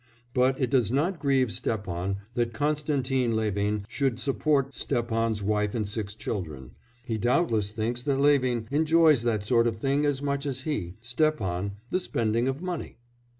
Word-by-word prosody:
But 130 Hz, +1 st, +2 dB
it 130 Hz, -2 st, 0 dB
does 125 Hz, -5 st, +3 dB
not 160 Hz, +7 st, 0 dB
grieve 135 Hz, -4 st, +2 dB
Stepan 95 Hz, -4 st, -2 dB, 0.2 s
that 120 Hz, -1 st, -1 dB
Konstantin 140 Hz, -4 st, 0 dB
Levin 105 Hz, -1 st, 0 dB
should 130 Hz, -1 st, -1 dB
support 140 Hz, 0 st, +1 dB
Stepan's 115 Hz, -3 st, -1 dB
wife 105 Hz, +1 st, 0 dB
and 110 Hz, -3 st, -1 dB
six 105 Hz, 0 st, -4 dB
children; 80 Hz, -, -5 dB, 0.3 s
he 115 Hz, -3 st, -2 dB
doubtless 115 Hz, -, +1 dB
thinks 115 Hz, +2 st, -2 dB
that 140 Hz, +1 st, 0 dB
Levin 130 Hz, -5 st, +3 dB
enjoys 155 Hz, -2 st, +4 dB
that 115 Hz, -3 st, 0 dB
sort 115 Hz, +2 st, +3 dB
of 115 Hz, -, -1 dB
thing 140 Hz, +5 st, +1 dB
as 140 Hz, -1 st, -1 dB
much 140 Hz, 0 st, -1 dB
as 130 Hz, -2 st, -3 dB
he 105 Hz, -, -3 dB
Stepan 115 Hz, -, 0 dB, 0.2 s
the 185 Hz, -, +2 dB
spending 115 Hz, -7 st, 0 dB
of 135 Hz, +5 st, -2 dB
money. 180 Hz, -3 st, -4 dB
120 Hz, 155 wpm, -27 LUFS, 110-140 Hz, 0.3 s, enjoys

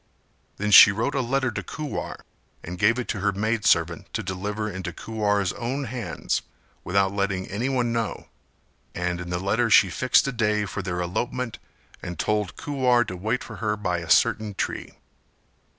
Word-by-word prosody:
Then 105 Hz, +1 st, -1 dB
she 100 Hz, -, +10 dB
wrote 110 Hz, +7 st, -1 dB
a 135 Hz, -, +1 dB
letter 130 Hz, +1 st, 0 dB
to -, -, -4 dB
Kuwar 150 Hz, -2 st, -5 dB, 0.4 s
and 90 Hz, +1 st, -7 dB
gave 110 Hz, +5 st, +4 dB
it 125 Hz, -, -3 dB
to 105 Hz, -, -2 dB
her 100 Hz, +2 st, +1 dB
maid 110 Hz, +2 st, -1 dB
servant 85 Hz, 0 st, +2 dB
to -, -, -2 dB
deliver 105 Hz, +3 st, -3 dB
into 95 Hz, -3 st, -5 dB
Kuwar's 105 Hz, -4 st, -1 dB
own 130 Hz, +4 st, -3 dB
hands, 115 Hz, -8 st, -3 dB, 0.4 s
without 95 Hz, +1 st, +1 dB
letting 100 Hz, -2 st, -1 dB
anyone 120 Hz, +3 st, -1 dB
know: 115 Hz, -2 st, -2 dB, 0.7 s
and 90 Hz, 0 st, -2 dB
in 90 Hz, -, -7 dB
the 90 Hz, -, -1 dB
letter 105 Hz, +6 st, +1 dB
she 95 Hz, -4 st, +6 dB
fixed 130 Hz, +5 st, +3 dB
a -, -, 0 dB
day 105 Hz, -3 st, +1 dB
for 100 Hz, -, -4 dB
their 90 Hz, -1 st, -3 dB
elopement 120 Hz, +7 st, -3 dB, 0.4 s
and 85 Hz, 0 st, -6 dB
told 105 Hz, -5 st, -1 dB
Kuwar 130 Hz, -4 st, +2 dB
to 95 Hz, -, -5 dB
wait 110 Hz, +7 st, -2 dB
for -, -, -9 dB
her 105 Hz, -1 st, -1 dB
by 90 Hz, -4 st, -1 dB
a 85 Hz, -1 st, -8 dB
certain 105 Hz, +3 st, +3 dB
tree. -, -, -4 dB
105 Hz, 175 wpm, -25 LUFS, 95-120 Hz, 0.7 s, she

